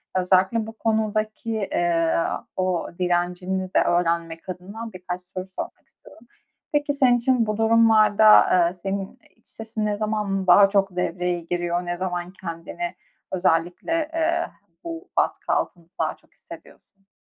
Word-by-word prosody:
özellikle 190 +4 +2
bu 225 - -8
konudaki, 215 0 -1 0.2
eee, 165 -1 +1 0.4
o 185 -2 -1
direncini 180 +1 0
de - - +6
öğrenmek 170 0 0
adına 205 +5 -7
birkaç 180 0 -6
soru 185 0 -7
sormak - - -7
istiyorum. 235 - -19 0.5
Peki, 290 0 +1
senin 255 -3 +4
için 240 -1 +2
bu 215 -1 -2
durumlarda, 220 -1 +6
ııı, 175 -1 +3
senin 195 +5 -5 0.2
iç 230 - -13
sesin 220 -1 -4
ne 205 -1 -1
zaman 210 -3 -1
daha 195 +3 +7
çok 195 -2 +1
devreye 180 0 -1
giriyor? 175 +1 -2
Ne 175 0 -3
zaman 180 -1 -3
kendini 170 - -5 0.4
özellikle, 185 - 0
eee, 335 +1 +1 0.4
bu 335 +2 -7
baskı - - +1
altında 170 -2 -2
daha - - 0
çok - - -31
hissediyorsun? 195 -1 -15
195 Hz, 135 wpm, -24 LUFS, 180-220 Hz, 0.5 s, daha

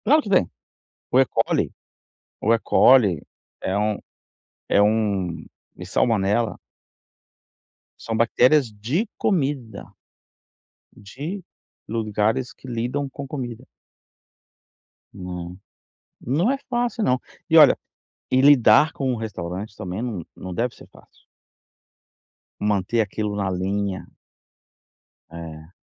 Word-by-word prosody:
Claro 305 +4 +5
que 210 - -8
tem. 185 - +3 0.6
O - - +4
Ecoli - - +1 0.7
o 115 - +3
Ecoli 115 - +5 0.4
é 95 +1 -1
um 105 0 0 0.7
é 100 - +4
um 100 -6 0 0.3
e - - -8
salmonela 110 0 +1 1.4
são 115 - -4
bactérias 125 +3 +3
de 125 - -2
comida, 135 - -1 1.1
de 150 - -7 0.5
lugares 110 +3 0
que 130 - -14
lidam 125 +4 -2
com 140 +1 -8
comida. 125 -3 -6 1.5
Não, 90 -2 -7 0.6
não 160 - +1
é 275 - 0
fácil 240 -2 -1
não. 130 -6 +2 0.3
E - - +5
olha, - - +8 0.5
e 130 - +4
lidar 140 0 +6
com 135 -2 -1
o - - -2
restaurante 105 -2 -5
também 95 0 -5
não 110 -9 -4
não 95 - -7
deve 120 +5 -1
ser - - -15
fácil. - - -22 1.3
Manter 105 +2 0
aquilo 105 0 -2
na 100 -2 -1
linha. 95 +1 -2 1.2
É. 80 -1 -9
110 Hz, 105 wpm, -23 LUFS, 100-130 Hz, 1.5 s, olha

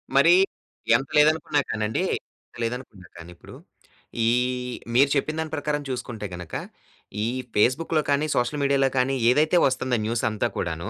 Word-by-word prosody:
మరీ, 355 - +6 0.6
ఎంత 135 - 0
లేదనుకున్నా 150 0 +3
కానండి, 110 0 -1 0.4
ఎంత - - -19
లేదనుకున్నా 115 -6 -6
కానీ 85 +1 -11
ఇప్పుడు, - - -14 0.7
ఈహ్, 125 +1 0 0.2
మీరు 140 +2 +5
చెప్పిన 155 +3 -1
దాని 160 -1 -4
ప్రకారం 150 0 -2
చూసుకుంటే 120 -4 -5
గనక 85 -3 -10 0.7
ఈ - - 0 0.3
ఫేస్‌బుక్‌లో 155 +8 +2
కానీ 145 +2 +2
సోషల్ 125 +4 0
మీడియాలో 140 -1 +2
కానీ 130 +2 +2
ఏదైతే 155 +7 +3
వస్తుందో 130 -2 -1
న్యూసంతా 115 0 0
కూడాను, 85 -1 -3
125 Hz, 140 wpm, -24 LUFS, 115-145 Hz, 0.7 s, మరీ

